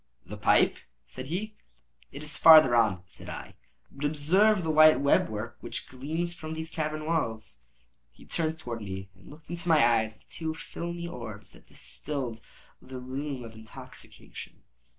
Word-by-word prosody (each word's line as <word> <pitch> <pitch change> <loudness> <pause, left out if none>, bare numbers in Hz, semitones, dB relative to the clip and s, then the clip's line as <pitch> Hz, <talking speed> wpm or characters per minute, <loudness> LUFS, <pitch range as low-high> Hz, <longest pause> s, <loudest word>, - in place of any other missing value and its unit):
"The - - -8
pipe," - - +3 0.3
said 130 +1 -8
he. 205 +8 -3 0.6
"It 145 - -8
is 150 0 -2
farther 155 -6 +8
on," 100 -6 +3
said - - -10
I; - - -7 0.4
"but 140 - -9
observe 180 +8 +3
the 160 - 0
white 155 0 +7
web 140 0 +3
work 110 +2 -5
which - - -5
gleams 160 +7 -2
from 160 -2 -6
these 160 +1 -5
cavern 155 -1 -3
walls." 110 - -2 0.4
He - - -18
turned 160 -1 -1
towards 120 -7 -6
me, 95 -1 -6
and 95 0 -18
looked 150 +2 -13
into 175 0 -4
my 155 -7 +6
eyes 110 0 -3
with - - -26
two 160 -2 -4
filmy 170 +1 -6
orbs 110 - -7
that - - -18
distilled 130 -6 -3 0.4
the 130 0 -9
rheum 130 +1 -5
of 115 -1 -9
intoxication. 110 0 -11
145 Hz, 165 wpm, -28 LUFS, 115-160 Hz, 0.6 s, farther